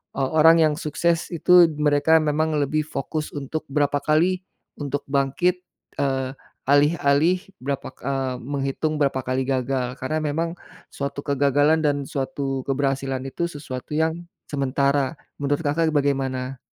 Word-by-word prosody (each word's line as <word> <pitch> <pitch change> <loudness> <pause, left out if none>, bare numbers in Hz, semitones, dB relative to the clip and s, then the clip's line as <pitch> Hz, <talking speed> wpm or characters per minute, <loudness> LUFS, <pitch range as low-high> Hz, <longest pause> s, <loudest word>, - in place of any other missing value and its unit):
o - - -1 0.2
orang 165 +2 +7
yang 155 -1 +3
sukses 165 +2 0
itu 175 +1 +6
mereka 150 +1 +4
memang 155 +1 0
lebih 150 +1 +1
fokus 155 +1 -4
untuk 145 +2 -4
berapa 145 0 +2
kali 175 +4 +2 0.4
untuk 145 0 -2
bangkit, 140 +7 +1 0.4
eee, 135 -2 0 0.4
alih-alih 145 +3 +3 0.2
berapa 140 0 -3
ka - - -22
eee, 135 -2 -1
menghitung 140 +3 -2
berapa 135 -2 +1
kali 130 +1 0
gagal 130 -1 -1
karena 155 +5 -1
memang 165 +3 -1 0.4
suatu 140 0 -4
kegagalan 145 +2 +3
dan 145 -1 +1
suatu 135 -1 -3
keberhasilan 135 -1 -1
itu 170 +6 -2
sesuatu 145 -2 -7
yang 160 +2 0 0.3
sementara 140 +1 +1 0.3
menurut 145 +3 0
Kakak 160 +3 +2
bagaimana? 135 -2 0
145 Hz, 135 wpm, -23 LUFS, 135-155 Hz, 0.4 s, orang